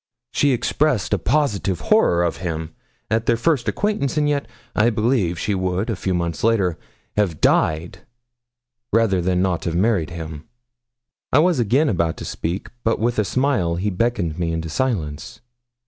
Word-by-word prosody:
She 145 - +2
expressed 125 -3 +1
a 105 - +2
positive 100 - 0
horror 90 - +3
of 85 - -1
him 80 -3 -4 0.4
at 110 +1 +1
their 115 - +3
first 135 0 +1
acquaintance; 205 -10 -1
and 150 -1 +2
yet, 145 -1 0 0.3
I 110 +3 +4
believe, 110 -6 +1
she 105 - -1
would, 95 +3 -1
a - - -1
few 95 0 -2
months 85 -3 -2
later, 100 -7 +2 0.4
have 95 -7 +1
died 80 +4 +1 0.9
rather 110 -5 +3
than 90 +1 +1
not 90 -3 -1
have 85 -2 -1
married 95 -3 +2
him.' 80 -2 -7 0.9
I - - +4
was 165 -1 +4
again 125 +7 +3
about 85 - 0
to - - -7
speak, 85 +4 -4
but 115 - +1
with 115 +1 0
a - - +3
smile 100 -8 +1
he 100 +4 -1
beckoned 90 -5 -1
me 85 -1 0
into 80 0 -3
silence. 80 - -2
95 Hz, 165 wpm, -21 LUFS, 85-120 Hz, 0.9 s, I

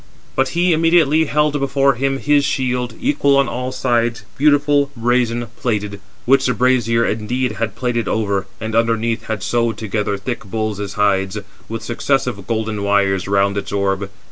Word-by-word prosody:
But 135 0 +1
he 175 0 +3
immediately 160 -1 +3
held 150 0 +1
before 140 0 +2
him 135 +2 -1
his 145 +1 +2
shield, 125 -3 -1
equal 250 - +2
on 140 -1 +3
all 125 +1 -3
sides, 120 -3 0
beautiful, 145 -1 +3
brazen, 120 0 +1
plated; 105 -4 -2 0.3
which 135 +1 +4
the 125 - 0
brazier 120 -2 +2
indeed 120 +3 -1
had 110 -1 -3
plated 120 -2 -1
over, 100 -3 -1
and 110 +1 -4
underneath 115 0 0
had 110 -2 -4
sewed 115 0 0
together 105 -2 -2
thick 120 +5 -5
bulls' 105 -1 -3
hides, 100 -1 +1 0.3
with 115 0 -5
successive 125 -4 -1
golden 110 -2 -2
wires 100 -2 +1
round 100 0 +1
its 100 - -7
orb. 100 -1 -1
115 Hz, 155 wpm, -18 LUFS, 105-135 Hz, 0.3 s, which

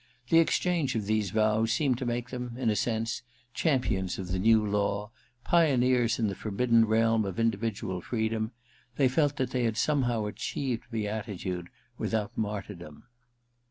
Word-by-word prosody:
The 165 - +6
exchange 165 -3 +1
of 110 -3 -1
these 110 -1 0
vows 110 +2 +2
seemed 130 -1 +1
to 130 - -3
make 120 +1 -2
them, 125 -2 -5
in 120 -4 +1
a - - 0
sense, 115 +3 -1 0.3
champions 110 - 0
of 95 -2 -6
the 95 +1 -1
new 110 +2 +4
law, 105 +1 -1 0.3
pioneers 125 -8 +3
in 115 - +1
the 100 - -1
forbidden 115 +3 +2
realm 115 0 +3
of 95 -1 -4
indi 115 -3 +1
vidual 100 -5 -3
freedom: 110 +1 -1 0.5
they 135 0 +4
felt 145 +2 +2
that 130 -3 -2
they 125 -1 0
had 115 -1 -1
some 145 +1 +2
how 115 -3 -1
achieved 115 +3 -3
beatitude 105 -5 -3 0.3
without 105 -2 -2
martyrdom. 100 -7 -5
115 Hz, 160 wpm, -29 LUFS, 105-125 Hz, 0.5 s, The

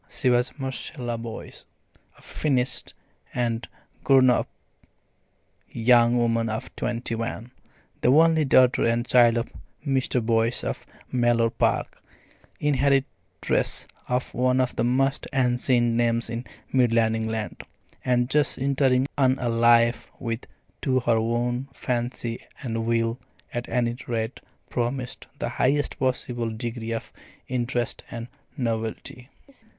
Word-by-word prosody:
She 130 -4 +1
was 120 +3 +1
Marcella 130 -2 -3
Boyce, 115 -1 -8 0.5
a - - -20
"finished" 130 -4 -1 0.4
and 120 -1 -1 0.4
grown 130 -2 +6
up - - 0 1.2
young 120 0 +4
woman 115 -1 +1
of 110 +1 -5
twenty 120 -1 -2
one, 115 +1 -4 0.5
the - - +3
only 160 +2 +5
daughter 130 -2 +4
and 115 +1 +1
child 120 -2 +5
of 115 - -3 0.3
Mr. 130 -2 +1
Boyce 115 0 +1
of - - -4 0.2
Mellor 120 -2 +2
Park, - - 0 0.6
inheritress 135 -10 0 0.2
of 125 +1 -1
one 125 +1 +2
of 125 -1 0
the - - 0
most 135 +3 +1
ancient 125 -2 +2
names 115 -1 +1
in 120 +2 -4 0.3
Midland 115 -3 +3
England, 110 -1 -3 0.4
and 125 -1 +2
just 145 +2 +2
entering 135 -1 +2
on 130 -1 +4
a 125 -3 -1
life 115 0 +4
which 115 0 -4 0.4
to 130 -1 +1
her 115 -1 +2
own 120 +3 -1
fancy 120 -2 -2 0.2
and 115 -2 -2
will, 115 +1 +1 0.3
at 120 0 -4
any 120 -1 0
rate, 115 0 -2 0.3
promised 125 +1 -3
the - - -2
highest 145 +2 0
possible 125 -2 -1
degree 115 +1 -4
of 115 - -5 0.3
interest 120 -1 -2
and 115 0 -7 0.3
novelty. 115 +1 -3
120 Hz, 125 wpm, -25 LUFS, 115-130 Hz, 1.2 s, grown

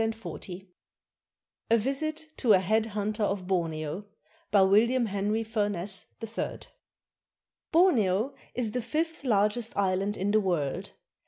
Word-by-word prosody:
I 220 -4 -4 1.1
A 230 - +5
VISIT 310 +6 -2
TO 230 -5 +4
A - - +7
HEAD 215 +4 +1
HUNTER 215 +1 -2
OF 200 -2 0
BORNEO 165 0 -2 0.4
BY 200 - +5
WILLIAM 230 +6 +4
HENRY 210 +2 -1
FURNESS, 205 -4 -1
THIRD 225 +1 -5 1.1
[Borneo 255 - +3 0.2
is 235 -4 0
the 250 - -1
fifth 320 +6 -2
largest 215 -1 +1
island 195 +1 +1
in 200 +2 0
the 215 - +4
world. 170 -8 -2
210 Hz, 120 wpm, -28 LUFS, 195-235 Hz, 1.1 s, A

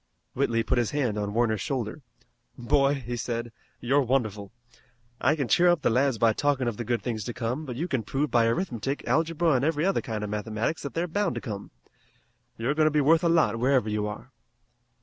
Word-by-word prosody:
Whitley 115 -1 +1
put 120 - +1
his 120 - 0
hand 130 -7 -1
upon 105 0 -3
Warner's 110 -4 +1
shoulder. 125 +3 -3 0.6
"Boy," 140 +3 +2
he 120 -3 -5
said, 120 0 -3 0.3
"you're 135 +4 +2
wonderful. 110 -6 -1 0.7
I 140 +5 +3
can 140 -5 -2
cheer 180 +7 +4
up 175 -4 +2
the - - +3
lads 130 +1 +2
by 115 0 +3
talkin' 140 0 0
of 115 -3 -2
the 120 - -3
good 120 +1 -1
things 110 -4 -3
to 120 - -5
come, 125 +6 -3
but 125 - -5
you 160 +8 -2
can 130 -8 -1
prove 135 +7 -2
by 115 -2 +4
arithmetic, 135 - -2
algebra 165 +1 +2
an' 130 0 +1
every 155 +1 +1
other 195 - +1
kind 110 -2 -4
of 105 - -4
mathematics 110 +7 -2
that 140 - -6
they're 170 +2 0
bound 200 +2 -1
to - - -4
come. 105 -5 -6 0.9
You're 120 +5 0
goin' 155 0 +2
to - - +5
be 150 - +2
worth 160 +4 +4
a 170 - +3
lot 135 -10 +3
wherever 125 -3 +2
you 105 0 -1
are." 105 +5 -8
125 Hz, 215 wpm, -27 LUFS, 115-150 Hz, 0.9 s, to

